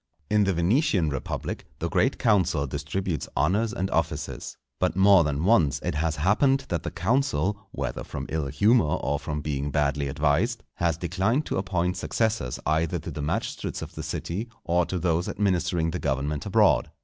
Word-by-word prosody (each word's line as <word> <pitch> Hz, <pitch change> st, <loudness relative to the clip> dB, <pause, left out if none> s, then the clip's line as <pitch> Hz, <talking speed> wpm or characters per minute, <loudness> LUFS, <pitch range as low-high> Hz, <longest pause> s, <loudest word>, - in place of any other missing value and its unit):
In 105 Hz, -1 st, +4 dB
the 95 Hz, -, +2 dB
Venetian 95 Hz, -, +2 dB
Republic, 65 Hz, -, -4 dB
the -, -, -2 dB
great -, -, +1 dB
council 90 Hz, -10 st, +2 dB
distributes 75 Hz, +4 st, -3 dB
honours 100 Hz, +10 st, +2 dB
and 95 Hz, -5 st, -2 dB
offices. 80 Hz, -1 st, -2 dB, 0.2 s
But 90 Hz, -, +1 dB
more 95 Hz, -2 st, +6 dB
than 75 Hz, 0 st, -1 dB
once 90 Hz, -, +4 dB
it -, -, -1 dB
has 80 Hz, +1 st, 0 dB
happened 130 Hz, -, +2 dB
that 85 Hz, -3 st, -1 dB
the 85 Hz, -, -4 dB
council, 105 Hz, -, 0 dB
whether 65 Hz, -8 st, -4 dB
from -, -, -6 dB
ill 80 Hz, -3 st, -1 dB
humour 100 Hz, -, +3 dB
or 70 Hz, +2 st, -1 dB
from 75 Hz, 0 st, -4 dB
being 70 Hz, -1 st, -2 dB
badly 70 Hz, -1 st, 0 dB
advised, 80 Hz, -, +1 dB
has 85 Hz, -3 st, +1 dB
declined 95 Hz, -, 0 dB
to -, -, -2 dB
appoint 90 Hz, -2 st, -1 dB
successors 110 Hz, -, -1 dB
either 80 Hz, +1 st, +1 dB
to -, -, -6 dB
the 75 Hz, -, -5 dB
magistrates 75 Hz, -, -3 dB
of -, -, -9 dB
the -, -, -6 dB
city 105 Hz, +8 st, -4 dB
or 85 Hz, 0 st, +1 dB
to 90 Hz, -, -2 dB
those 85 Hz, 0 st, 0 dB
administering 85 Hz, -4 st, 0 dB
the -, -, -3 dB
government 70 Hz, +1 st, -2 dB
abroad. -, -, +3 dB
85 Hz, 175 wpm, -26 LUFS, 75-100 Hz, 0.2 s, more